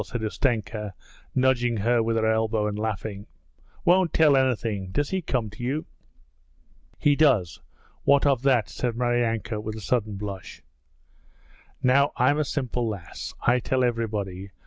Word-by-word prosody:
said 120 +1 -5
Ustenka, 110 -3 -1 0.4
nudging 120 -3 +2
her 115 +3 +2
with 115 0 0
her 110 - +1
elbow 110 -1 +1
and 105 -1 -2
laughing. 105 -1 -4 0.6
'Won't 180 -1 +4
tell 150 -3 +5
anything. 115 -7 0
Does 145 +9 -1
he 190 -1 0
come 120 - -2
to 105 - -11
you?' 135 +6 -2 1.1
'He 145 -1 +3
does. 125 - +2 0.4
What 140 0 +4
of 135 -4 +3
that?' 130 -5 +3
said 120 -2 -3
Maryanka 120 -3 0
with 110 0 -5
a - - -6
sudden 110 0 -1
blush. 100 -2 -7 1.2
'Now 140 +3 +4
I'm 145 +4 +3
a 155 - +1
simple 125 -4 -2
lass. 100 -6 -6
I 125 +1 +4
tell 130 +1 0
everybody. 105 -5 -2
115 Hz, 145 wpm, -25 LUFS, 105-130 Hz, 1.2 s, tell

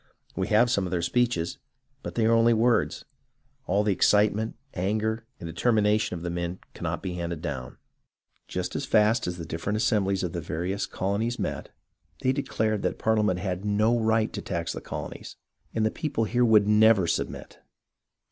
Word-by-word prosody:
We - - -1
have 115 +3 +4
some 100 -6 +1
of - - -3
their 85 -1 -1
speeches, 120 -4 0 0.4
but - - -7
they 115 - +2
are 115 - +4
only 115 0 +5
words. 115 +2 +1 0.6
All 100 +3 +2
the 105 -1 +2
excite 105 +2 +4
ment, 110 +2 -3 0.2
anger, 110 +4 -1
and - - -8
determination 105 +3 +1
of 85 - -9
the 90 - -2
men 85 +1 -3 0.2
cannot - - -4
be 95 -2 -3
handed 85 -2 -4
down. 65 -6 -5 0.7
Just 90 0 -4
as - - -2
fast 110 -1 +3
as 90 0 -3
the 85 - -6
different 85 +6 -3
assembhes 100 -4 +1
of 90 - -3
the 85 - -3
various 90 +5 -3
colonies 105 +6 -1
met, - - -4 0.5
they 130 - +3
declared 110 -6 -1
that - - -1
Parliament 105 -4 +2
had 90 -1 -3
no 105 +3 +2
right 110 0 +1
to - - -4
tax 85 -3 -3
the - - -6
colonies - - -7 0.4
and 110 -1 0
the 110 - +1
people 145 -7 -2
here 120 +3 +2
never 105 0 +5
would 85 - -1
sub - - -1
mit. - - -11
105 Hz, 185 wpm, -27 LUFS, 90-110 Hz, 0.7 s, only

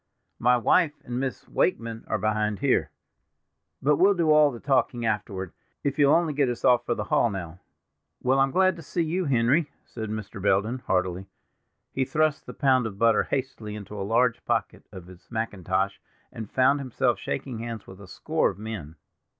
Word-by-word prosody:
My 125 +1 +4
wife 150 +6 +3
and 120 0 -4
Miss 130 -1 -4
Wakeman 115 -9 -1
are - - 0
behind 105 -1 0
here; - - +1 0.9
but 145 +1 +3
we'll 195 +2 +5
do 165 -3 +2
all 150 -1 +6
the 120 -4 -8
talking 125 -3 +1
afterward, 100 -4 -2 0.3
if 140 +1 -2
you'll 145 0 +6
only 165 -3 +1
get 140 -2 +1
us 120 +1 -3
off 125 -2 +4
for 120 - +1
the 105 - -3
hall 115 - +2
now." 90 -4 -6 0.6
"Well, 130 +2 +2
I - - +6
am 135 - +1
glad 185 +4 +3
to - - -8
see 170 +3 -2
you, 175 +3 -1
Henry," 140 +4 +2 0.2
said 110 -2 -6
Mr. 105 -1 -6
Belden 105 +6 +1
heartily. 95 -3 -1 0.7
He 130 - +1
thrust 155 +2 0
the - - -7
pound 130 -4 +3
of 100 -3 -8
butter 115 +1 +3
hastily 130 -6 -4
into 105 0 -9
a 100 - -5
large 115 +4 +1
pocket - - -2
of 95 -4 -10
his 90 0 -16
mackintosh, 100 -3 -2 0.3
and 110 -2 -7
found 135 +2 +3
himself 130 -4 0
shaking 125 -4 -4
hands 115 -2 -6
with 95 +1 -13
a 100 - -11
score - - 0
of - - -8
men. 100 -8 -7
115 Hz, 190 wpm, -26 LUFS, 105-140 Hz, 0.9 s, all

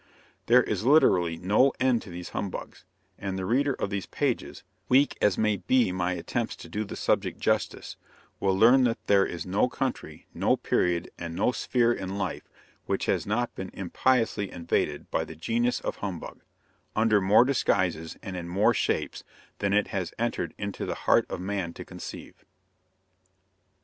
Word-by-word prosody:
There 125 +1 +6
is 105 -2 -2
literally 90 - +4
no 105 +10 +3
end 125 -2 +2
to 105 - -11
these 90 0 -7
humbugs; 95 - -6 0.3
and 95 -1 -3
the 95 - -3
reader 135 +6 +2
of 100 - -3
these 100 -3 -3
pages, - - -2 0.3
weak 135 +3 +4
as 105 -3 +3
may 105 -2 +2
be 120 0 +2
my 90 0 -1
attempts 90 +7 -3
to - - -11
do 105 - -2
the 105 - -7
subject - - 0
justice, - - -1 0.4
will 95 -1 +1
learn 125 +6 +6
that 115 -2 +1
there 100 -1 +4
is 85 -2 -5
no 100 +7 +1
country, - - -4
no - - +2
period, 85 -1 0
and 85 -1 -5
no 125 - +2
sphere 120 -1 +1
in 95 -2 -5
life 95 -2 -4 0.4
which - - -1
has - - 0
not 120 +3 -1
been 95 0 -6
impiously 110 +1 +1
invaded 75 -3 -2
by - - +1
the 80 - -9
genius 120 +9 0
of - - -4
humbug, 95 -5 -6 0.5
under 110 -2 +3
more 100 +6 +5
disguises 90 - 0
and 95 - -6
in 85 -1 -5
more 95 +4 +3
shapes - - -1 0.4
than 100 - 0
it 105 +1 +2
has 95 -3 -3
entered 120 0 -2
into 100 -1 -4
the - - -2
heart - - +4
of - - -4
man 95 -2 -3
to - - -9
conceive. - - -9
100 Hz, 170 wpm, -27 LUFS, 90-115 Hz, 0.5 s, There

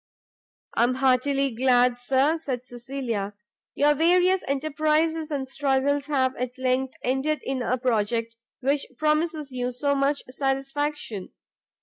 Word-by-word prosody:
"I - - +1
am 255 +1 0
heartily 270 +1 +2
glad, 245 0 +3
Sir," 270 +6 +2
said 255 -5 -4
Cecilia, 240 -5 -4 0.4
"your 295 +1 +4
various 360 +4 +3
enterprizes 310 +3 0
and 275 -3 -3
struggles 280 +1 0
have 260 -3 +1
at 250 +1 -4
length 260 0 0
ended 265 +3 0
in 265 -1 -2
a 250 +1 0
project 230 -1 0 0.3
which 275 +2 0
promises 305 -1 0
you 250 -1 -2
so 280 +3 0
much 280 +1 +1
satisfaction. 270 -4 -2
270 Hz, 125 wpm, -25 LUFS, 250-295 Hz, 0.4 s, your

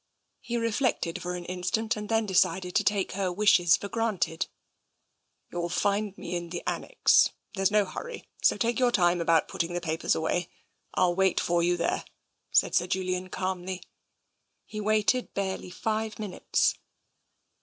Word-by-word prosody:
He 240 -1 -3
reflected 230 -6 0
for 180 0 -3
an 175 -1 -6
instant 185 +5 -1
and 210 -1 -6
then 225 -1 +2
decided 185 -1 +1
to - - +3
take 200 -2 +1
her 190 -1 -1
wishes 175 -3 +5
for 200 - -6
granted. 210 -7 -1 0.5
" - - -48
You 175 - -4
will 170 0 -2
find 200 +2 0
me - - -5
in 175 -1 -4
the 175 0 -5
annexe. - - +3 0.2
There's 195 -2 +2
no 210 -1 +3
hurry, 480 - -7
so - - +4
take 235 0 0
your 250 -1 +4
time 175 -5 +3
about 165 -1 +3
putting 170 +1 -2
the 175 - -1
papers 160 -1 0
away. 160 +2 -1 0.5
I'll 180 -1 +3
wait 190 0 +2
for 175 0 +1
you 175 +1 +2
there," 170 - -1 0.5
said - - +3
Sir 180 0 +2
Julian 185 0 -2
calmly. 185 0 -3 0.8
He 215 -1 -6
waited 215 +4 +1
barely 190 -2 -3
five 220 +3 -2
minutes. 205 -4 0
185 Hz, 165 wpm, -28 LUFS, 175-215 Hz, 0.8 s, wishes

